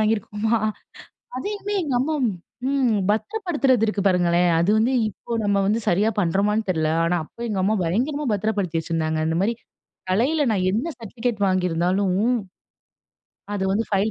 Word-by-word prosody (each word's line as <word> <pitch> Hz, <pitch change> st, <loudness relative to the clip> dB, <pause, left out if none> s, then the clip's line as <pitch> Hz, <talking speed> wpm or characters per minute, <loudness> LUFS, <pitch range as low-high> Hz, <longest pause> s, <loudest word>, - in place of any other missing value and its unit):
வாங்கிருக்கோமா? 215 Hz, +1 st, 0 dB, 0.8 s
அதையுமே 410 Hz, +7 st, -4 dB
எங்க 290 Hz, -4 st, -2 dB
அம்மா 295 Hz, +5 st, 0 dB, 0.5 s
ம், 270 Hz, -4 st, +2 dB, 0.2 s
பத்திரப்படுத்துறது 280 Hz, -, +1 dB
இருக்கு 210 Hz, -2 st, -1 dB
பாருங்களேன், 175 Hz, -1 st, +3 dB
அது 170 Hz, +4 st, +2 dB
வந்து 225 Hz, +4 st, +2 dB, 0.2 s
இப்போ 215 Hz, -, -12 dB
நம்ம 205 Hz, -1 st, +2 dB
வந்து 210 Hz, +3 st, +1 dB
சரியா 200 Hz, +5 st, +3 dB
பண்றோமான்னு 205 Hz, +4 st, +1 dB
தெரியல 160 Hz, -3 st, +1 dB, 0.2 s
ஆனா 175 Hz, +1 st, +1 dB
அப்போ 235 Hz, -, -15 dB
எங்க 200 Hz, -3 st, -1 dB
அம்மா 210 Hz, +3 st, +2 dB
பயங்கரமா 260 Hz, -, -1 dB
பத்ரப்படுத்தி 200 Hz, -5 st, -1 dB
வச்சிருந்தாங்க. 160 Hz, -1 st, -1 dB
இந்த 160 Hz, +1 st, 0 dB
மாரி 215 Hz, +4 st, +1 dB, 0.6 s
கலைல 255 Hz, +12 st, +2 dB
நான் 190 Hz, -4 st, 0 dB
என்ன 225 Hz, -, -1 dB
சர்டிபிகேட் 230 Hz, 0 st, -3 dB
வாங்கிருந்தாலும், 185 Hz, +1 st, +1 dB, 1.4 s
அது 195 Hz, -2 st, -1 dB
வந்து 220 Hz, +3 st, +1 dB
பைல் 200 Hz, +3 st, +2 dB
210 Hz, 140 wpm, -23 LUFS, 185-235 Hz, 1.4 s, பாருங்களேன்